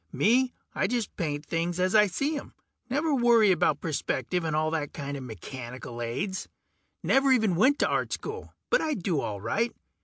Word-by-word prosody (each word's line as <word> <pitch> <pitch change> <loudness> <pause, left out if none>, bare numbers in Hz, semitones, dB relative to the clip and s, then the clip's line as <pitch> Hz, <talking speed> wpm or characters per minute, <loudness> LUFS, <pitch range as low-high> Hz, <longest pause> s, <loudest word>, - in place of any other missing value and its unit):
Me, 250 +4 +3 0.2
I - - +1
just 235 0 -2
paint 150 -4 -3
things 170 +3 -2
as 185 +1 +2
I 210 -1 +6
see 280 - -1
'em. 285 - -7 0.3
Never 295 +4 +1
worry 235 -5 +5
about 155 -4 +2
perspective 155 +1 -1
and 160 -2 -1
all 155 0 +1
that 150 -3 -2
kinda 140 -1 -5
mechanical 120 - -7
aids. 185 - -3 0.5
Never 270 0 +4
even 220 -8 +3
went 260 +11 +4
to - - +2
Art - - 0
School. 435 +1 -5 0.2
But - - +4
I 310 -2 0
do 175 -5 -1
all 100 -2 -4
right. 230 - 0
180 Hz, 180 wpm, -28 LUFS, 145-240 Hz, 0.5 s, I